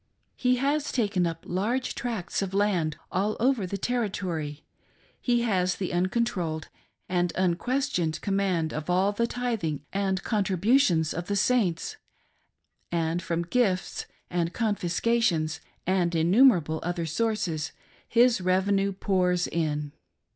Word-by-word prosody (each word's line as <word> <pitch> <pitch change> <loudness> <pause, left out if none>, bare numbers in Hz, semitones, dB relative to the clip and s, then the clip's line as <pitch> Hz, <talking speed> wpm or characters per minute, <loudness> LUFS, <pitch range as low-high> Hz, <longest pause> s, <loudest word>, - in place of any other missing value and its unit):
He 250 0 +2
has 280 +3 0
taken 200 -7 +1
up 165 0 -6
large 225 +8 -1
tracts 225 -9 -3
of 195 -1 -3
land 185 -7 +1
all 200 +4 0
over 240 -5 +2
the 200 - -3
Territory, 185 -10 -2 0.6
he 240 -1 +2
has 185 -5 +1
the 185 -3 -3
uncontrolled 180 -4 -1 0.4
and 175 -1 +1
unques 245 +11 0
tioned 160 -2 0
command 190 -5 0
of 155 +2 -5
all 185 +3 +3
the 235 +3 0
tithing 220 - -2
and 195 -1 0
contributions 195 - +2
of 175 0 -4
the 205 - 0
Saints, 200 -5 +1 0.9
and 165 0 0
from 170 -1 -1
gifts 190 -1 0 0.2
and 175 -1 -1
confiscations, 200 -6 +1 0.3
and 180 -2 +1
innumerable 170 - +4
other 175 0 -2
sources, 165 -4 -1 0.4
his 235 -3 +4
revenue 195 +2 +2
pours 180 -2 +1
in. 150 -3 -2
185 Hz, 125 wpm, -27 LUFS, 170-225 Hz, 0.9 s, innumerable